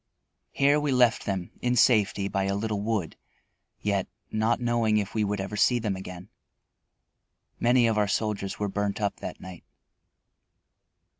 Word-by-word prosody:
Here 140 +2 +3
we 150 -1 -1
left 125 -3 +3
them 95 -3 -3
in 125 0 +1
safety 105 -4 +3
by 95 -1 -1
a 100 0 0
little 105 0 -2
wood, 105 -6 -2 0.7
yet 100 -2 0 0.2
not 110 +2 +1
knowing 120 -3 +1
if 100 -2 -2
we 110 - +1
would 105 0 -1
ever 95 +2 -4
see 120 +4 +3
them 110 -4 -2
again. 90 0 -9 1.3
Many 120 0 +4
of 110 -2 +2
our 105 - +2
soldiers 100 -1 -2
were 105 - -1
burnt 100 +1 -2
up 100 -1 -1
that - - -7
night. 95 -2 -10
105 Hz, 155 wpm, -27 LUFS, 100-115 Hz, 1.3 s, Many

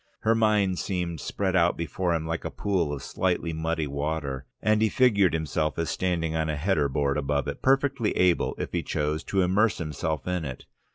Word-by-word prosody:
Her 110 - +3
mind 105 -5 +2
seemed 90 -4 -2
spread 95 +4 -2
out 85 -1 +3
before 85 +2 -1
him 80 -1 -2
like 80 +1 -3
a - - -3
pool 90 -7 -1
of 70 -2 -5
slightly 90 -2 -1
muddy 80 0 -1
water, 70 -1 -3
and 110 0 +2
he 110 - +4
figured 100 -10 +3
himself 80 0 -1
as 85 -1 -1
standing 85 -3 -1
on 80 -1 0
a 75 - 0
header 75 -2 +1
board 70 +1 0
above 70 0 -1
it, 70 - -5
perfectly 135 -3 +2
able, 90 -1 +2
if - - -4
he - - 0
chose, 75 +1 -2
to 95 -2 +1
immerse 100 +5 +2
himself 80 -2 -3
in 90 -2 -1
it. 65 -4 -6
85 Hz, 195 wpm, -26 LUFS, 75-95 Hz, -, he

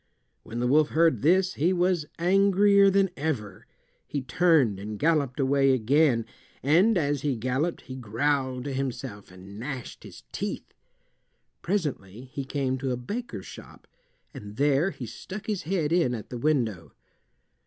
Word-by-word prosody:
When 115 - -7
the 120 - 0
wolf 150 +4 +4
heard 160 -7 +2
this 185 +5 +3
he 165 +6 +1
was 180 -3 +1
angrier 195 +2 +4
than 195 -1 +2
ever. 125 -10 -4 0.4
He 140 -3 -3
turned 135 - +3
and 105 +1 -6
galloped 150 -2 +1
away 135 0 +3
again, 130 0 +2 0.4
and 180 - +4
as 145 -4 0
he 140 -3 0
galloped 130 +8 -1
he 130 - -9
growled 130 +2 -1
to 140 0 -4
himself 130 -5 -5
and 95 +3 -12
gnashed 130 -1 -6
his - - -12
teeth. - - -5 0.9
Presently 130 - -3
he 140 -3 -4
came 130 -2 -2
to 135 0 -2
a 125 - -1
baker's 205 - -6
shop, - - -13 0.5
and 105 0 -9
there 145 - +2
he - - -7
stuck 195 +2 -8
his 210 -4 -2
head 165 -6 0
in 165 -9 +2
at 110 - -9
the 120 - -5
window. 115 - -1
140 Hz, 155 wpm, -26 LUFS, 125-170 Hz, 0.9 s, wolf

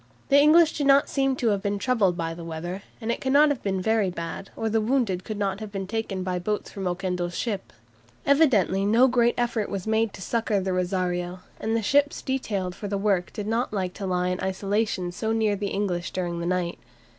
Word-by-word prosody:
The 280 0 +6
English 315 +2 +6
do 290 - -1
not 280 +1 +5
seem 270 -1 +1
to 240 -3 +1
have 200 -2 +1
been 200 0 -1
troubled 200 -6 +1
by 165 -1 -2
the 170 0 -8
weather, 170 +3 -5 0.2
and 230 -1 -2
it - - -3
cannot 285 +3 +5
have 285 -4 -1
been 195 -2 -1
very 220 0 +2
bad, 170 +2 -6
or 225 - -2
the 220 0 +1
wounded 215 -6 0
could 215 +1 -5
not 195 -1 -1
have 215 -2 -7
been 195 -1 -4
taken 195 -2 -3
by 180 -1 -2
boats 210 +4 -3
from 195 -2 -4
Oquendo's 180 -1 -2
ship. 205 -5 -3 0.5
Evidently 255 - +3
no 230 +6 +5
great 240 -1 +3
effort 235 -3 0
was 195 -2 -4
made 220 0 +1
to - - -10
succour 225 -2 0
the 190 0 -1
"Rosario," 180 -1 -1 0.2
and 225 +1 -1
the 225 - -2
ships 285 +6 +2
detailed 205 -9 -2
for 205 - -6
the 200 0 -1
work 195 -3 +1
did 210 - -5
not 225 +2 -1
like 185 -3 -2
to 195 - -5
lie 180 0 0
in 180 +1 -2
isolation 195 -1 -1
so 220 +5 -2
near 220 -2 +2
the 200 0 -3
English 185 -4 -2
during 175 -2 -3
the 170 - -3
night. 180 -1 -1
200 Hz, 220 wpm, -25 LUFS, 185-225 Hz, 0.5 s, The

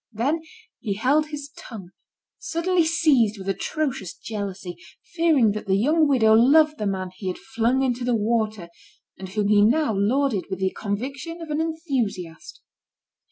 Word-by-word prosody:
Then 270 +9 -1 0.4
he 205 -4 -3
held 280 +8 +2
his 290 -1 -7
tongue, 195 -7 -10 0.5
suddenly 350 -1 0
seized 295 -10 +3
with 190 -1 -9
atrocious 205 - -3
jealousy, 195 -5 -6 0.4
fearing 320 -10 +3
that 210 0 -6
the 190 - +3
young 305 +8 +3
widow 230 -6 +4
loved 300 +7 +5
the 210 - -1
man 185 -2 -3
he 190 - -7
had 180 - -2
flung 260 0 0
into 250 -1 -1
the 245 -1 +1
water, 215 -4 -1 0.5
and 190 -1 -7
whom 205 +1 -1
he 210 -1 +5
now 265 +3 +2
lauded 220 +1 +1
with 190 - -3
the 190 0 0
conviction 265 +11 -5
of 325 -2 -7
an 300 +1 0
enthusiast. 250 - -4
235 Hz, 160 wpm, -24 LUFS, 200-300 Hz, 0.5 s, loved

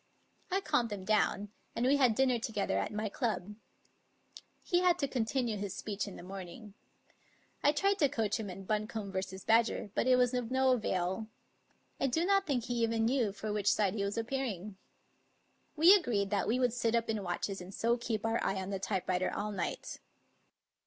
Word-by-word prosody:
I 385 +2 +1
calmed 290 - +1
him 195 -2 -5
down, 205 -1 +1 0.3
and 235 - 0
we 275 +2 +4
had 250 -5 +4
dinner 255 -1 +3
together 220 -3 -1
at - - -2
my 215 +1 -2
club. 210 -3 -2 1.1
He 350 - +2
had 360 -1 +3
to 280 - 0
continue 240 -2 -1
his 200 -1 -4
speech 205 -1 -3
in 200 - -8
the - - -10
morning. 195 +3 -9 0.9
I 290 - +5
tried 395 +7 +1
to 290 -4 +4
coach 225 -5 -1
him 210 -3 -4
in 190 +1 -8
Buncombe 215 0 -2
v. 190 - +1 0.3
Badger, 225 -2 +2
but - - 0
it 255 - +6
was 250 0 +3
of 245 -2 -1
no 260 0 +3
avail. 190 -3 0 0.7
I 275 - +2
do 320 +7 +1
not 390 0 +3
think 260 -5 0
he 240 0 -2
even 225 -1 +1
knew 240 -3 +2
for 210 +1 -4
which 205 -1 +2
side 200 -3 +1
he 205 -2 -2
was 200 +2 -2
appearing. 225 -5 -3 1.0
We 330 +5 +8
agreed 215 - +2
that 200 -2 +1
we 235 - +2
would 250 -2 +2
sit 235 -1 +1
up 230 0 +1
in 220 -2 -1
watches 190 +1 -3
and 180 +1 -9
so 230 +4 +1
keep 230 -3 -3
our 225 +1 0
eye 195 - 0
on 190 +1 -4
the 195 - -2
typewriter 185 -2 -1
all 210 +1 -3
night. 185 -4 -4
225 Hz, 195 wpm, -32 LUFS, 200-250 Hz, 1.1 s, We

